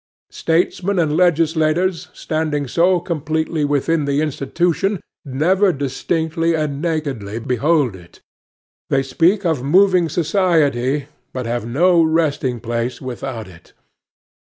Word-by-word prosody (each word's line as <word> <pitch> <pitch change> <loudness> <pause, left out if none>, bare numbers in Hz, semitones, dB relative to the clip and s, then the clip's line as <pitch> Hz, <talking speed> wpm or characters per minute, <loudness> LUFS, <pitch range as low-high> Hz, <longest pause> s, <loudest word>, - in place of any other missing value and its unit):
Statesmen 180 +4 0
and 155 -3 +1
legislators, 165 +1 +1
standing 155 -3 -2
so 175 +6 +2
completely 160 -2 -2
within 145 +2 +1
the 140 0 0
institution, 170 +6 -1 0.2
never 180 +9 +2
distinctly 160 +4 -1
and 150 -2 -2
nakedly 140 -11 -3
behold 130 - +1
it. 85 -2 -16 0.7
They 135 0 +2
speak 175 +9 +1
of 160 -6 +1
moving 180 +4 +3
society, 150 -6 +1 0.3
but 130 -2 -4
have 120 -1 -3
no 170 +8 +3
resting 155 -6 0
place 120 +2 -3
without 125 -3 -6
it. 85 -2 -17
155 Hz, 110 wpm, -19 LUFS, 135-170 Hz, 0.7 s, moving